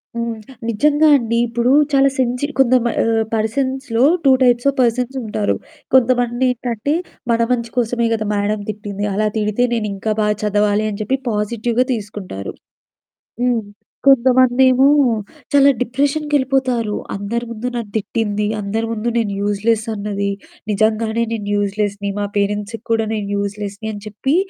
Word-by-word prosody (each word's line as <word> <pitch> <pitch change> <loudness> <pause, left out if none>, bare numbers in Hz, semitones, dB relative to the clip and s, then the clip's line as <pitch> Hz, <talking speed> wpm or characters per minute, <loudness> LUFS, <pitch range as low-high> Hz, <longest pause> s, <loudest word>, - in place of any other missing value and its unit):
హ్మ్. 235 -1 -2 0.3
నిజంగా 295 +7 +3
అండి. 235 -1 -1
ఇప్పుడు 235 +2 +1 0.2
చాలా 275 0 +5
సెన్సీ 250 +2 0
కొంత 255 -1 +4
మా 235 - +1
ఆహ్, 225 -1 +2
పర్సన్స్‌లో 260 +2 0 0.2
2 270 - +7
టైప్స్ 245 +1 +3
ఆఫ్ 275 - -4
పర్సన్స్ 250 +2 0
ఉంటారు. 210 -1 -1 0.4
కొంతమందేంటంటే, 245 0 +1 0.4
"మన 230 0 +2
మంచి 235 -2 0
కోసమే 235 0 +1
గదా! 215 -1 -1
మేడమ్ 205 0 -1
తిట్టింది. 205 -1 -4
అలా 215 +2 +1
తిడితే 210 +3 0
నేనింకా 215 -1 -2
బాగా 210 0 +1
చదవాలి" 210 0 +1
అని 205 0 -6
చెప్పి 260 +6 0
పాజిటివ్‌గా 230 +3 0
తీసుకుంటారు. 200 - -6 0.9
హ్మ్. 245 -2 +2 0.5
కొంతమందేమో 260 0 +5 0.7
చాలా 280 0 +6
డిప్రెషన్‌కెళ్ళిపోతారు. 265 -3 0 0.2
"అందరి 225 +4 -3
ముందు 230 +2 -4
నన్ను 230 -4 -4
తిట్టింది. 210 -1 -1
అందరి 215 +3 -2
ముందు 230 +1 -2
నేను 215 -4 0
యూజ్‌లెస్ 215 +2 0
అన్నది. 200 -1 -2 0.4
నిజంగానే 220 +2 +1
నేను 210 -2 -4
యూజ్‌లెస్‌ని, 205 0 -1
మా 205 - 0
పేరెంట్స్‌కి 205 +2 -2
కూడా 225 -1 +1
నేను 210 -2 -3
యూజ్‌లెస్‌ని" 200 +1 -4
అని 205 - -8
చెప్పి, 265 +8 -1
225 Hz, 130 wpm, -18 LUFS, 210-250 Hz, 0.9 s, 2